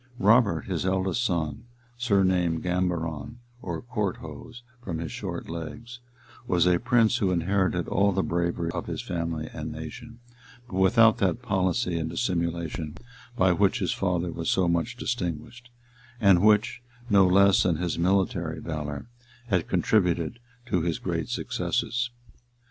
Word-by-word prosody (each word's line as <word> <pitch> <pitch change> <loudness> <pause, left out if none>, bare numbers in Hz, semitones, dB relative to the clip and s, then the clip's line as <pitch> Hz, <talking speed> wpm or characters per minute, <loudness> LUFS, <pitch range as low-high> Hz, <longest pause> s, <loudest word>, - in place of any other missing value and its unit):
Robert, 110 +1 +4
his 90 -4 -3
eldest 95 +4 0
son, 80 - -2 0.3
surnamed 95 -8 +1
Gambaron 90 +1 -2 0.2
or 85 -3 -5
Courthose, 120 +1 -5 0.2
from 85 -6 -4
his 80 -1 -5
short - - -5
legs, 115 +9 -7 0.5
was 90 -4 +3
a 90 -1 +4
prince 120 -2 +3
who 100 -5 +1
inherited 90 0 0
all 100 +2 +2
the 95 0 0
bravery 85 -1 -1
of 85 - -5
his - - -4
family 85 -2 -3
and 75 0 -5
nation; 115 +10 -8 0.5
but 95 - -6
without 110 +4 +5
that 100 +6 0
policy 95 -5 0
and 80 0 -2
dissimulation 85 -6 -2 0.4
by 95 0 +4
which 100 +6 +2
his 95 -7 0
father 90 -2 -1
was 80 -1 -3
so 95 -2 +2
much 85 +6 0
distinguished, 120 +2 -4 0.5
and 100 -5 +5
which, 105 +2 +3 0.3
no 100 -4 +5
less 100 +1 +5
than 90 -3 +2
his 85 0 -2
military 90 -3 +1
valor, 75 -3 -5 0.4
had 90 -6 +1
contributed 90 0 +1 0.3
to 90 -7 0
his 85 -1 -1
great - - -3
successes. 120 +1 -1
90 Hz, 140 wpm, -26 LUFS, 85-105 Hz, 0.5 s, without